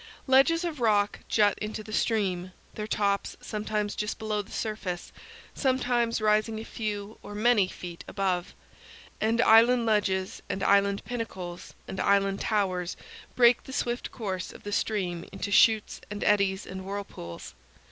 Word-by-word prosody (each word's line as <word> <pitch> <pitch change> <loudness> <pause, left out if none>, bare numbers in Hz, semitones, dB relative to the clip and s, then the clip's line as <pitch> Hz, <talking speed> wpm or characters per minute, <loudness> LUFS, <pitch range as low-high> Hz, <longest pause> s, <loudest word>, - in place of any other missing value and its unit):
Ledges 275 +6 +4
of 330 -5 -3
rock 205 -3 +2
jut 205 -2 +3
into 215 0 -4
the 215 0 -9
stream, 185 -5 0 0.2
their 210 0 -5
tops 200 -2 0
sometimes 210 -1 -2
just 210 0 -3
below 215 -1 -1
the 200 - -15
surface, 200 -5 -4 0.4
sometimes 245 -3 +1
rising 215 +1 +2
a - - -6
few 210 -2 -5
or 205 - -9
many 215 -2 +4
feet 175 -2 -8
above; 185 -3 -1 0.7
and 225 +2 +2
island 235 +2 +6
ledges 190 -4 0
and 195 - -2
island 200 0 +3
pinnacles 190 -7 -6
and 190 - -6
island 195 0 +2
towers 185 -4 0 0.4
break 240 -1 +5
the 265 - -8
swift 245 -2 -2
course 190 -6 -4
of - - -14
the 205 - -5
stream 185 -6 -1
into 200 - -4
chutes 220 +1 +4
and 205 0 -4
eddies 200 -2 +2
and 190 0 -7
whirlpools. 195 - -7
210 Hz, 145 wpm, -28 LUFS, 195-225 Hz, 0.7 s, island